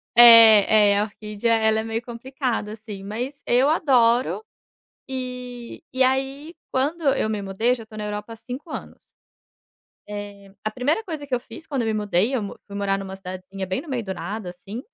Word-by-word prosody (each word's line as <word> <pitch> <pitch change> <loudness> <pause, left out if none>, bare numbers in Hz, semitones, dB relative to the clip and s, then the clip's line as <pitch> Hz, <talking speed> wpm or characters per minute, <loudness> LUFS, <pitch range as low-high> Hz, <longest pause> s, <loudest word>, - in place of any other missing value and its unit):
É, 220 -3 +9
é, 200 - +3
a - - +2
orquídea 215 +2 -1
ela 220 0 +2
é - - -2
meio 225 0 -3
complicada 240 -2 -4
sim, 210 -3 -9
mas 245 +8 -5
eu 250 +3 +4
adoro. 255 - +3 0.6
E 250 -1 -6
e 260 - +2
aí 270 +5 0 0.2
quando 295 +6 0
eu - - 0
me 210 -2 -2
mudei, 195 +5 0
eu - - +3
já 240 - -8
estou 220 -1 -11
na 210 - -4
Europa 210 +2 -5
há - - -9
5 255 +8 -8
anos, - - -9 1.0
eh, 205 -1 -8
a 215 - 0
primeira 270 - 0
coisa 315 -7 -6
que 270 - -1
eu 245 - -1
fiz 240 +7 -12
quando 275 -4 -1
eu - - -2
me - - +1
mudei, 210 +3 +1
eu 245 - 0
mo 200 - -6
fui 200 - -11
morar 195 -1 0
numa 195 -1 -6
cidadezinha 185 +1 -7
bem 190 +6 -2
no 335 - -14
meio 255 -4 -2
do 190 -1 -4
nada, 195 +3 -5
assim, 195 +6 -8
225 Hz, 200 wpm, -23 LUFS, 205-255 Hz, 1.0 s, É